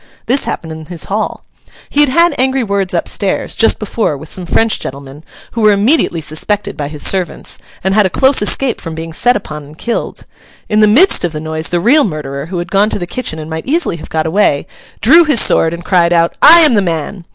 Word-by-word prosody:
This 265 Hz, +3 st, +1 dB
happened 160 Hz, -, -5 dB
in 160 Hz, 0 st, -8 dB
his 170 Hz, 0 st, -6 dB
hall. 210 Hz, +2 st, -4 dB, 0.5 s
He 290 Hz, -, 0 dB
had 295 Hz, -2 st, +4 dB
had 335 Hz, +5 st, +3 dB
angry 260 Hz, 0 st, +1 dB
words 200 Hz, -3 st, -2 dB
up 170 Hz, -, -1 dB
stairs, 200 Hz, -2 st, -1 dB
just 225 Hz, -, +2 dB
before, 210 Hz, -7 st, -2 dB
with 155 Hz, +2 st, -12 dB
some 180 Hz, -2 st, -5 dB
French 225 Hz, +5 st, +1 dB
gentlemen, 140 Hz, +2 st, -9 dB, 0.3 s
who 230 Hz, -, -4 dB
were 215 Hz, -1 st, +5 dB
immediately 200 Hz, -, +1 dB
suspected 200 Hz, +7 st, -2 dB
by 145 Hz, -, -4 dB
his 150 Hz, 0 st, -5 dB
servants, 185 Hz, -2 st, -2 dB, 0.2 s
and 190 Hz, +1 st, 0 dB
had 210 Hz, -1 st, +3 dB
a -, -, -6 dB
close 265 Hz, +5 st, +2 dB
escape 245 Hz, +4 st, 0 dB
from 165 Hz, -2 st, -7 dB
being 165 Hz, 0 st, -7 dB
set 245 Hz, +8 st, +2 dB
upon 150 Hz, -7 st, -8 dB
and 150 Hz, +2 st, -15 dB
killed. 235 Hz, +5 st, -4 dB, 0.4 s
In 210 Hz, -, +1 dB
the 215 Hz, -, +5 dB
midst 295 Hz, -, +4 dB
of 175 Hz, -2 st, -2 dB
the 155 Hz, -, -4 dB
noise, 155 Hz, +1 st, -2 dB
the 175 Hz, -, 0 dB
real 275 Hz, -, +4 dB
murderer, 145 Hz, -5 st, -5 dB
who 180 Hz, +1 st, -5 dB
had 175 Hz, +1 st, -5 dB
gone 205 Hz, +2 st, +2 dB
to -, -, -2 dB
the 175 Hz, -, -4 dB
kitchen 175 Hz, -3 st, -5 dB
and 155 Hz, -1 st, -7 dB
might 160 Hz, +4 st, -6 dB
easily 315 Hz, -, 0 dB
have -, -, -11 dB
got 160 Hz, -1 st, -2 dB
away, 160 Hz, -4 st, +1 dB, 0.4 s
drew 320 Hz, +10 st, +6 dB
his 295 Hz, -7 st, +2 dB
sword 165 Hz, -, +2 dB
and 170 Hz, 0 st, -8 dB
cried 175 Hz, -2 st, +2 dB
out, 170 Hz, 0 st, +2 dB
'I 335 Hz, +2 st, +9 dB
am 305 Hz, -6 st, +5 dB
the 205 Hz, -, +3 dB
man! 170 Hz, +1 st, -4 dB
190 Hz, 230 wpm, -13 LUFS, 160-230 Hz, 0.5 s, I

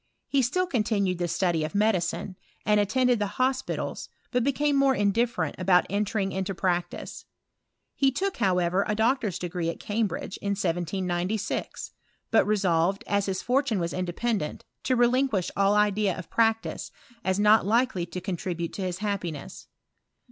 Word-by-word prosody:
He 275 Hz, -, +2 dB
still 330 Hz, +10 st, +1 dB
continued 210 Hz, -, 0 dB
the 175 Hz, -, 0 dB
study 170 Hz, -1 st, 0 dB
of 155 Hz, +5 st, -4 dB
medicine, 200 Hz, -2 st, 0 dB, 0.3 s
and 210 Hz, 0 st, +4 dB
attended 245 Hz, +3 st, +2 dB
the 205 Hz, -, 0 dB
hospitals, 260 Hz, +1 st, -1 dB, 0.2 s
but 250 Hz, -1 st, +1 dB
became 285 Hz, +2 st, +1 dB
more 275 Hz, -1 st, +4 dB
indifferent 205 Hz, -5 st, +1 dB
about 180 Hz, -1 st, +4 dB
entering 200 Hz, -1 st, 0 dB
into 190 Hz, 0 st, -3 dB
prac 175 Hz, -2 st, 0 dB
tice. -, -, -8 dB, 0.7 s
He 270 Hz, -1 st, +2 dB
took, 385 Hz, +8 st, -2 dB
however, 185 Hz, -2 st, +2 dB
a 210 Hz, -, 0 dB
doctor's 225 Hz, -3 st, +1 dB
degree 175 Hz, -1 st, -3 dB
at -, -, -5 dB
Cam 215 Hz, +1 st, 0 dB
bridge 190 Hz, +2 st, -6 dB
in 200 Hz, 0 st, -2 dB
1796; 180 Hz, +3 st, -2 dB, 0.4 s
but 220 Hz, -3 st, +4 dB
resolved, 190 Hz, -2 st, +1 dB
as 200 Hz, 0 st, 0 dB
his 190 Hz, -1 st, -2 dB
fortune 255 Hz, -3 st, +1 dB
was 170 Hz, -1 st, -2 dB
independent, 185 Hz, 0 st, -2 dB, 0.2 s
to 255 Hz, -, +2 dB
relinquish 240 Hz, -5 st, +2 dB
all 200 Hz, +1 st, +3 dB
idea 210 Hz, -2 st, +2 dB
of 185 Hz, -, -9 dB
practice, 225 Hz, -1 st, +1 dB, 0.3 s
as 190 Hz, +1 st, 0 dB
not 210 Hz, +1 st, +5 dB
likely 220 Hz, -4 st, +1 dB
to 180 Hz, -, -5 dB
contribute 175 Hz, -2 st, -4 dB
to -, -, -5 dB
his 180 Hz, -2 st, -2 dB
happiness. 175 Hz, -8 st, -4 dB
200 Hz, 155 wpm, -27 LUFS, 180-230 Hz, 0.7 s, not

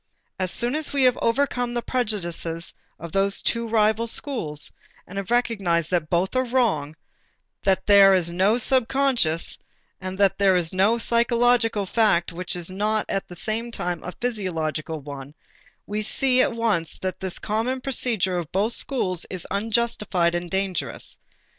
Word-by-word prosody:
As 185 Hz, -1 st, +1 dB
soon 240 Hz, +7 st, +3 dB
as 310 Hz, 0 st, 0 dB
we 280 Hz, -2 st, +2 dB
have 250 Hz, -1 st, +3 dB
overcome 245 Hz, 0 st, 0 dB
the 240 Hz, -, -2 dB
prejudices 175 Hz, -8 st, -2 dB, 0.2 s
of 170 Hz, 0 st, -9 dB
those 195 Hz, +1 st, +1 dB
two 230 Hz, 0 st, -1 dB
rival 220 Hz, +1 st, +2 dB
schools 195 Hz, -, -2 dB, 0.3 s
and 195 Hz, +2 st, -6 dB
have 195 Hz, -, -7 dB
recognized 195 Hz, -9 st, 0 dB
that 170 Hz, -4 st, 0 dB
both 180 Hz, +6 st, 0 dB
are 255 Hz, -, +2 dB
wrong, 225 Hz, -, 0 dB, 0.7 s
that 190 Hz, -1 st, +1 dB
there 200 Hz, -1 st, +7 dB
is 170 Hz, -2 st, +1 dB
no 190 Hz, +6 st, +2 dB
subconscious 250 Hz, -, +2 dB, 0.4 s
and 185 Hz, 0 st, -6 dB
that 195 Hz, -1 st, +2 dB
there 195 Hz, -2 st, +4 dB
is 175 Hz, -2 st, 0 dB
no 200 Hz, +5 st, +3 dB
psychological 235 Hz, -2 st, +2 dB
fact 185 Hz, -5 st, +1 dB
which 180 Hz, +1 st, -3 dB
is 175 Hz, 0 st, -3 dB
not 210 Hz, +3 st, -1 dB
at 195 Hz, -, -2 dB
the 175 Hz, -, -10 dB
same 225 Hz, +6 st, -3 dB
time 175 Hz, -7 st, -3 dB
a 180 Hz, -, -6 dB
physiological 165 Hz, -9 st, -3 dB
one, 140 Hz, 0 st, -9 dB, 0.5 s
we 210 Hz, +1 st, -3 dB
see 255 Hz, +4 st, +2 dB
at -, -, +2 dB
once 215 Hz, -8 st, -1 dB
that 185 Hz, -1 st, -4 dB
this 190 Hz, -2 st, -4 dB
common 225 Hz, +5 st, -2 dB
procedure 235 Hz, -8 st, 0 dB
of 165 Hz, -4 st, -7 dB
both 210 Hz, +5 st, +2 dB
schools 185 Hz, -, +2 dB
is 185 Hz, -2 st, -5 dB
unjustified 210 Hz, -5 st, 0 dB
and 175 Hz, 0 st, -3 dB
dangerous. 190 Hz, -1 st, -3 dB
200 Hz, 160 wpm, -23 LUFS, 175-235 Hz, 0.7 s, there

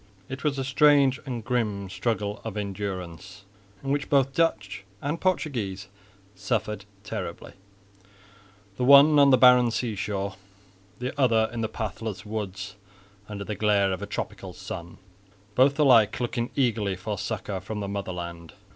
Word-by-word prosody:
It 130 Hz, -, -6 dB
was 145 Hz, -2 st, 0 dB
a 135 Hz, -, -1 dB
strange 135 Hz, -1 st, +4 dB
and 120 Hz, -4 st, -4 dB
grim 105 Hz, -6 st, -1 dB
struggle 105 Hz, +1 st, -2 dB
of 110 Hz, -2 st, -5 dB
endurance, 95 Hz, -2 st, -5 dB, 0.4 s
in 135 Hz, -, -2 dB
which 145 Hz, 0 st, -1 dB
both 135 Hz, -1 st, +3 dB
Dutch 105 Hz, -12 st, 0 dB, 0.2 s
and 145 Hz, +7 st, -3 dB
Portuguese 110 Hz, -, -1 dB, 0.4 s
suffered 105 Hz, 0 st, -2 dB, 0.2 s
terribly, 95 Hz, -6 st, -6 dB, 1.2 s
the 125 Hz, -, -1 dB
one 140 Hz, +3 st, +8 dB
on 140 Hz, -1 st, +7 dB
the 130 Hz, -, +6 dB
barren 125 Hz, -1 st, +7 dB
sea 115 Hz, 0 st, -2 dB
shore, 100 Hz, 0 st, -3 dB, 0.6 s
the 125 Hz, +2 st, -4 dB
other 115 Hz, -3 st, +3 dB
in 115 Hz, -, -3 dB
the 110 Hz, -, -1 dB
pathless 110 Hz, -1 st, -5 dB
woods 105 Hz, -2 st, -5 dB, 0.5 s
under 100 Hz, -1 st, -5 dB
the 105 Hz, -, -4 dB
glare 100 Hz, -1 st, +2 dB
of 95 Hz, -, -5 dB
a 100 Hz, -, -5 dB
tropical 105 Hz, -, -5 dB
sun, 85 Hz, 0 st, -8 dB, 0.6 s
both 135 Hz, +5 st, +4 dB
alike 120 Hz, -8 st, +5 dB
looking 120 Hz, -1 st, -2 dB
eagerly 110 Hz, -7 st, +1 dB
for 105 Hz, +4 st, -4 dB
succour 100 Hz, -1 st, -4 dB
from 105 Hz, +3 st, -5 dB
the 100 Hz, -, -3 dB
Motherland. 85 Hz, -4 st, -5 dB
110 Hz, 145 wpm, -26 LUFS, 100-130 Hz, 1.2 s, one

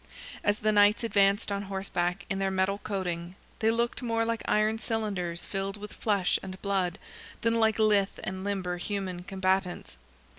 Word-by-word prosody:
As 205 Hz, 0 st, +2 dB
the 215 Hz, 0 st, +2 dB
Knights 205 Hz, +2 st, +5 dB
advanced 200 Hz, -1 st, +3 dB
on 200 Hz, 0 st, -1 dB
horseback, 190 Hz, -1 st, -2 dB
in 195 Hz, -, -2 dB
their 195 Hz, 0 st, +1 dB
metal 190 Hz, +1 st, +1 dB
coating, 180 Hz, -3 st, -3 dB, 0.2 s
they 220 Hz, -, +3 dB
looked 235 Hz, +1 st, 0 dB
more 230 Hz, -2 st, +1 dB
like 230 Hz, 0 st, -1 dB
iron 215 Hz, +1 st, +2 dB
cylinders 200 Hz, -7 st, -2 dB
filled 195 Hz, 0 st, -3 dB
with 210 Hz, 0 st, -8 dB
flesh 200 Hz, -4 st, +1 dB
and 190 Hz, 0 st, -7 dB
blood, 190 Hz, -2 st, 0 dB, 0.4 s
than 230 Hz, 0 st, +2 dB
like 220 Hz, -1 st, +3 dB
lithe 210 Hz, -3 st, +4 dB, 0.2 s
and 190 Hz, 0 st, -4 dB
limber 190 Hz, -3 st, -2 dB
human 185 Hz, -1 st, -3 dB
combatants. 190 Hz, -, -1 dB
200 Hz, 160 wpm, -29 LUFS, 190-215 Hz, 0.4 s, Knights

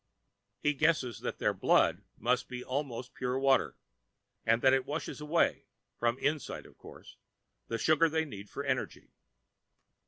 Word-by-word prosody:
He 150 Hz, -, +2 dB
guesses 145 Hz, -6 st, +1 dB
that -, -, -4 dB
their -, -, +1 dB
"blood" -, -, +3 dB, 0.2 s
must 125 Hz, +1 st, +1 dB
be 125 Hz, 0 st, -5 dB
almost 130 Hz, -2 st, -4 dB
pure 125 Hz, 0 st, -2 dB
water, 135 Hz, 0 st, +2 dB, 0.7 s
and 115 Hz, +1 st, +3 dB
that 130 Hz, -1 st, +6 dB
it 135 Hz, -1 st, +1 dB
washes 150 Hz, 0 st, -4 dB
away 155 Hz, +3 st, +1 dB, 0.3 s
(from 120 Hz, 0 st, +2 dB
the -, -, -7 dB
inside, 150 Hz, -2 st, -1 dB
of -, -, -16 dB
course) -, -, -13 dB, 0.5 s
the 115 Hz, -, -2 dB
sugar 155 Hz, +7 st, +4 dB
they 160 Hz, +1 st, 0 dB
need 105 Hz, -7 st, -9 dB
for 140 Hz, -, -5 dB
energy. 130 Hz, -2 st, -3 dB
135 Hz, 155 wpm, -31 LUFS, 125-150 Hz, 0.7 s, that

